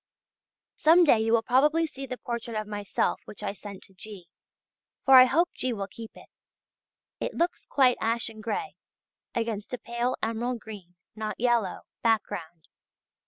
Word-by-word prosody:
Some 335 +3 +6
day 275 -9 +5
you 225 0 +1
will 230 -1 +4
probably 300 +7 +3
see 270 -3 -7
the 255 - -5
portrait 235 -2 -4
of 215 - -4
myself 205 -1 -1
which 210 - -10
I 200 -1 -2
sent 200 -1 -10
to 195 - -15
G., 190 -2 -10 0.8
for 270 - +6
I 255 - +9
hope 335 +7 +2
G. 255 -1 -2
will 200 -3 -3
keep 225 +3 -10
it: - - -13 0.9
it - - -3
looks 345 +1 -1
quite 255 -3 +4
ashen 225 -1 -1
grey 395 - -4 0.6
against 225 -1 -2
a - - -9
pale 240 +2 -2
emerald 235 +2 -1
green 200 -6 -11 0.2
(not 215 0 -4
yellow) 235 -5 +1 0.2
background. 180 -8 -1
230 Hz, 160 wpm, -27 LUFS, 210-255 Hz, 0.9 s, I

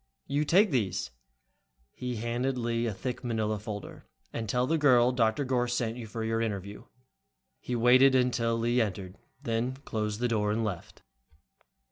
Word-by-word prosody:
You 145 +2 0
take 190 +5 +4
these," 110 - -1 0.8
he 125 -1 -4
handed 120 +4 -1
Lee 115 0 -1
a - - -1
thick 125 +6 -5
manila 110 -3 -1
folder, 105 -1 -8 0.3
"and 110 -2 -4
tell 125 +4 +1
the 160 +4 +1
girl 125 -4 +5
Dr. 120 +2 +1
Gorss 125 -1 0
sent 115 -2 -1
you 120 -2 -7
for 110 +1 -5
your 115 0 0
interview." 100 -2 -4 0.7
He 125 - -4
waited 130 +3 +6
until 120 -2 +2
Lee 120 +2 0
had 115 -3 +4
entered, 95 0 -10 0.2
then 120 0 -1
closed 105 -2 -2
the 125 - +1
door 105 -3 0
and 110 +2 0
left. 100 -6 -6
115 Hz, 165 wpm, -29 LUFS, 110-125 Hz, 0.8 s, waited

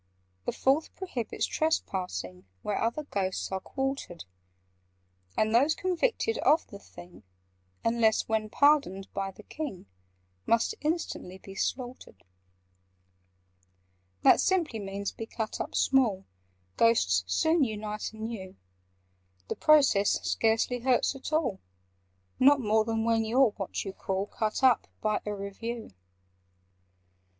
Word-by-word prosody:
"The - - 0
Fourth 275 +4 +1
prohibits 260 - -3
trespassing 140 - -2 0.2
Where 205 - -1
other 235 +7 -1
Ghosts 195 -9 -2
are 190 - -1
quartered: 270 - -4 1.1
And 215 0 +2
those 280 +7 +4
convicted 450 +5 0
of 315 - +4
the 200 - -11
thing 175 -2 -14 0.6
(Unless 230 -1 +2
when 220 -1 0
pardoned 285 -9 +2
by 195 0 -2
the 195 +3 -13
King) 285 - -6 0.6
Must 230 - +2
instantly 300 - -3
be 195 +1 -12
slaughtered. 245 - -4 2.0
"That - - +6
simply 335 -12 +1
means 200 0 -4
'be 225 - -7
cut 220 -1 -4
up - - -5
small': 230 -8 +2 0.5
Ghosts 90 - +4
soon 320 - +3
unite 215 -2 -3
anew. 220 -4 -6 0.9
The - - -1
process 275 -10 +4
scarcely 225 +2 +1
hurts 250 +2 +2
at 270 - -7
all— 285 -11 0 0.8
Not 280 +2 +6
more 220 -2 +2
than 225 0 -1
when 230 -1 +2
you 225 +4 0
're 265 -5 +6
what 200 -1 -4
you 195 - -5
call 190 0 -2
'Cut 215 +4 -3
up' 255 -3 +4
by 215 -1 0
a 210 - -2
Review. 220 - -6
225 Hz, 125 wpm, -29 LUFS, 200-270 Hz, 2.0 s, That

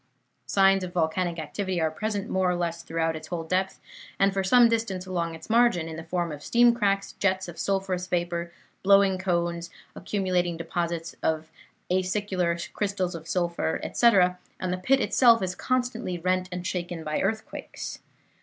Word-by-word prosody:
Signs 195 +5 +4
of 180 -1 -6
volcanic 170 +1 0
activity 175 +4 -3
are 160 -1 +1
present 205 +4 -3
more 190 -1 +1
or 180 - +1
less 170 -1 -2
throughout 165 -1 -1
its 155 0 -8
whole 170 -1 -3
depth 185 +3 -1 0.4
and 195 0 +3
for 195 0 0
some 240 +5 +6
distance 225 -5 -1
along 170 -3 -2
its 160 - -12
margin, 225 -8 +3
in 160 - -6
the 160 - -7
form 175 0 -2
of 145 -1 -7
steam 240 +7 +4
cracks, 200 -3 0
jets 190 -1 +1
of 175 - -9
sulphurous 190 -2 -1
vapor, 175 -1 -2 0.3
blowing 195 -1 +5
cones, 170 -2 -1 0.3
accumulating 180 -3 -1
deposits 170 0 -3
of 160 0 -1 0.4
acicular 185 -2 -1
crystals 195 -3 -1
of 165 -1 -8
sulphur, 170 -2 -1
etc., 185 -6 +3 0.2
and 185 -1 -2
the - - -1
pit 265 +9 +3
itself 235 -3 +5
is 180 -1 -1
constantly 245 -5 -1
rent 185 +1 0
and 180 0 -5
shaken 175 -2 -3
by 155 0 -1
earthquakes. 220 +3 -4
180 Hz, 165 wpm, -26 LUFS, 170-195 Hz, 0.4 s, some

